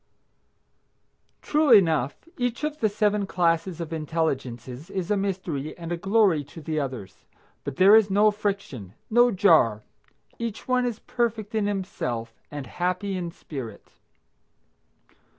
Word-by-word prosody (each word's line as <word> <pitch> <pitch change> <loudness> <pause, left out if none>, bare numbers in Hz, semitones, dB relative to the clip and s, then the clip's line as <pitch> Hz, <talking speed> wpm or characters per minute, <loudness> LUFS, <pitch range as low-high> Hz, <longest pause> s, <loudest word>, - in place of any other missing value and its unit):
True 305 0 +2
enough, 165 - +4
each 245 +2 -2
of 300 0 -2
the 215 - +2
seven 205 -1 +1
classes 170 -1 0
of 165 -1 -5
intelligences 140 -4 -3
is 190 0 -3
a - - +4
mystery 185 -7 -3
and 170 -1 -7
a - - +1
glory 195 -3 +2
to 145 - -12
the 155 0 -2
others. 125 -9 -6 0.4
But 140 -1 -5
there 190 +5 +7
is 220 -2 +5
no 205 +2 +4
friction, 195 - -4 0.2
no 240 +2 +6
jar. 165 - +4 0.6
Each 230 -2 -5
one 250 -1 +2
is 235 -3 -3
perfect 225 -3 -2
in 215 -2 +1
himself 125 - -3 0.2
and 145 -2 -6
happy 180 - -2
in 175 -2 -3
spirit. 135 -8 -9
185 Hz, 135 wpm, -25 LUFS, 150-210 Hz, 0.6 s, there